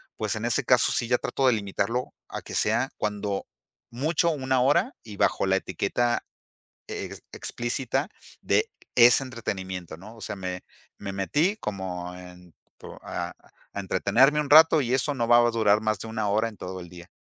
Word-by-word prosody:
pues, -, -, -2 dB
en -, -, -4 dB
ese -, -, +1 dB
caso -, -, +4 dB
sí 115 Hz, -, -1 dB
ya 125 Hz, -, +4 dB
trato 135 Hz, +1 st, 0 dB
de 125 Hz, -, +5 dB
limitarlo 105 Hz, +3 st, -2 dB, 0.2 s
a -, -, -5 dB
que -, -, -10 dB
sea -, -, +1 dB
cuando 105 Hz, -1 st, -2 dB, 0.4 s
mucho 150 Hz, +7 st, +1 dB
una 130 Hz, -3 st, 0 dB
hora 145 Hz, -, +2 dB
y 105 Hz, -3 st, -10 dB
bajo -, -, +2 dB
la 95 Hz, 0 st, +3 dB
etiqueta 120 Hz, +6 st, -1 dB, 0.6 s
e -, -, -6 dB, 0.2 s
explícita 130 Hz, +4 st, -2 dB, 0.3 s
de 450 Hz, -, +1 dB, 0.3 s
ese 120 Hz, +2 st, +7 dB
entretenimiento, 95 Hz, -9 st, -5 dB
¿no? 105 Hz, +7 st, -12 dB
O -, -, -14 dB
sea, 105 Hz, -1 st, -5 dB
me 90 Hz, -1 st, -5 dB, 0.4 s
me 100 Hz, -1 st, -6 dB
metí 150 Hz, -, +1 dB
como 90 Hz, -, -5 dB
en 90 Hz, -1 st, -13 dB, 0.5 s
a -, -, -4 dB, 0.4 s
a 100 Hz, -, -4 dB
entretenerme 115 Hz, +10 st, +3 dB
un 145 Hz, -2 st, -4 dB
rato, 160 Hz, +1 st, +8 dB
y 125 Hz, -2 st, 0 dB
eso 135 Hz, +2 st, 0 dB
no 120 Hz, -3 st, -1 dB
va 120 Hz, 0 st, +7 dB
a 120 Hz, 0 st, +4 dB
durar 110 Hz, -2 st, +3 dB
más 110 Hz, -1 st, 0 dB
de 115 Hz, -, -6 dB
1 110 Hz, -2 st, -2 dB
hora 110 Hz, +3 st, +1 dB
en 110 Hz, -, -12 dB
todo 95 Hz, +1 st, -6 dB
el 85 Hz, -, -10 dB
día. 85 Hz, 0 st, -12 dB
110 Hz, 180 wpm, -26 LUFS, 95-130 Hz, 0.6 s, rato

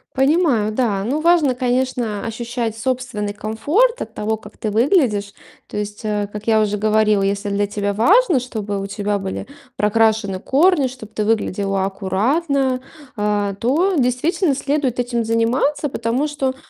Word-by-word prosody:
Понимаю, 270 Hz, -6 st, +2 dB
да. 215 Hz, -4 st, 0 dB
Ну, 275 Hz, +8 st, -1 dB
важно, 330 Hz, -5 st, +4 dB
конечно, 250 Hz, -4 st, -1 dB
ощущать 230 Hz, 0 st, -3 dB
собственный 240 Hz, -4 st, -2 dB
комфорт 300 Hz, -, +1 dB
от -, -, -6 dB
того, 220 Hz, +1 st, -1 dB
как 210 Hz, -1 st, -14 dB
ты 215 Hz, -, -3 dB
выглядишь. 220 Hz, -, +2 dB, 0.3 s
То -, -, -7 dB
есть, 210 Hz, 0 st, -4 dB
э, 210 Hz, -1 st, -1 dB
как 210 Hz, +1 st, -7 dB
я 220 Hz, -1 st, +4 dB
уже 210 Hz, -1 st, 0 dB
говорила, 215 Hz, -1 st, +2 dB
если 200 Hz, +1 st, -1 dB
для 200 Hz, 0 st, 0 dB
тебя 205 Hz, 0 st, -2 dB
важно, 345 Hz, -, +4 dB
чтобы 210 Hz, -5 st, -4 dB
у 195 Hz, -, -4 dB
тебя 205 Hz, 0 st, -2 dB
были 190 Hz, -1 st, -5 dB, 0.3 s
прокрашены 215 Hz, -2 st, +1 dB
корни, 295 Hz, -, +3 dB
чтоб 245 Hz, -4 st, -11 dB
ты 210 Hz, -, -1 dB
выглядела 195 Hz, -3 st, 0 dB
аккуратно, 255 Hz, -, 0 dB, 0.3 s
а, 205 Hz, -2 st, 0 dB
то 300 Hz, -, +1 dB
действительно 275 Hz, +5 st, +1 dB
следует 275 Hz, -3 st, -1 dB
этим 240 Hz, -1 st, 0 dB
заниматься. 235 Hz, +6 st, +1 dB
Потому 240 Hz, +4 st, -1 dB
что, 270 Hz, -3 st, -2 dB
225 Hz, 150 wpm, -20 LUFS, 210-265 Hz, 0.3 s, важно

